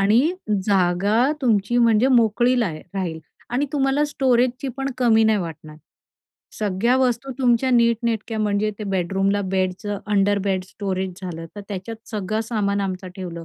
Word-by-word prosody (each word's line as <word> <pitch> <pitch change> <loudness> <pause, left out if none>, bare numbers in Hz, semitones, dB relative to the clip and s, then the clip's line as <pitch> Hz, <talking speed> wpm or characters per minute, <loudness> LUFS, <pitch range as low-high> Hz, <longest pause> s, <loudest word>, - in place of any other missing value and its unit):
आणि 210 +4 +4 0.5
जागा 200 +6 +2
तुमची 230 -2 +1
म्हणजे 230 +1 +4
मोकळी 240 0 +3
लाहे 165 -8 -2
राहील. 175 -4 -3 0.3
आणि 265 +4 0
तुम्हाला 275 +1 +2
स्टोरेजचीपण 260 -1 0
कमी 225 -3 +4
नाही 220 -1 +3
वाटणार. 155 -3 -7 0.8
सगळ्या 215 +4 +1
वस्तू 260 0 0
तुमच्या 250 0 +2
नीटनेटक्या 235 -2 +1
म्हणजे 210 0 +1
ते 210 - -5
बेडरूमला 195 +1 0
बेडचं 190 +2 -2
अंडर-बेड 200 -2 +1
स्टोरेज 190 -1 -3
झालं, 165 -2 -6
तर - - -5
त्याच्यात 200 +3 -5
सगळं 215 +1 -2
सामान 205 -3 -1
आमचं 185 -1 -4
ठेवलं. 170 -3 -6
210 Hz, 135 wpm, -22 LUFS, 190-240 Hz, 0.8 s, आणि